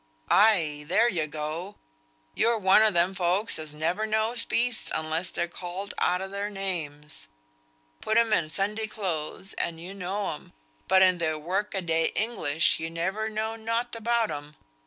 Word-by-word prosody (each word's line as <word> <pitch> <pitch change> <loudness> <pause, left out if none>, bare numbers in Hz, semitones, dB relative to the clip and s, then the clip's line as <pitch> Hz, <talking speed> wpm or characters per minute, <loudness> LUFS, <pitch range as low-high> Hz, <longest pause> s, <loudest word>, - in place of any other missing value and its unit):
"Ay, 165 -9 +4
there 230 +8 +4
you 165 -9 0
go! 155 +6 -5 0.6
You're 235 0 +2
one 195 0 +5
o' 220 - +6
them 175 0 +2
folks 185 +2 +1
as 155 -1 -6
never 170 +8 -1
knows 220 +2 0
beasts 240 -1 0
unless 160 +3 -2
they're 170 - -2
called 180 +3 -6
out 180 +1 +1
o' - - -4
their 200 +1 -3
names. 160 -7 -3 0.7
Put 220 - +1
'em 230 -2 +4
in 155 -5 +1
Sunday 210 +6 0
clothes 190 -3 -3
and 165 -1 -2
you 180 +3 -7
know 195 +1 -3
'em, 150 - -12 0.3
but 190 0 +6
in 185 -1 +4
their 155 -2 0
work 190 +7 -2
a 190 - -1
day 165 -1 +2
English 170 -9 +2
you 165 - -3
never 190 +7 -2
know 220 +1 -2
nought 230 +2 -2
about 230 -1 +1
'em. 145 0 -7
190 Hz, 170 wpm, -27 LUFS, 165-215 Hz, 0.7 s, o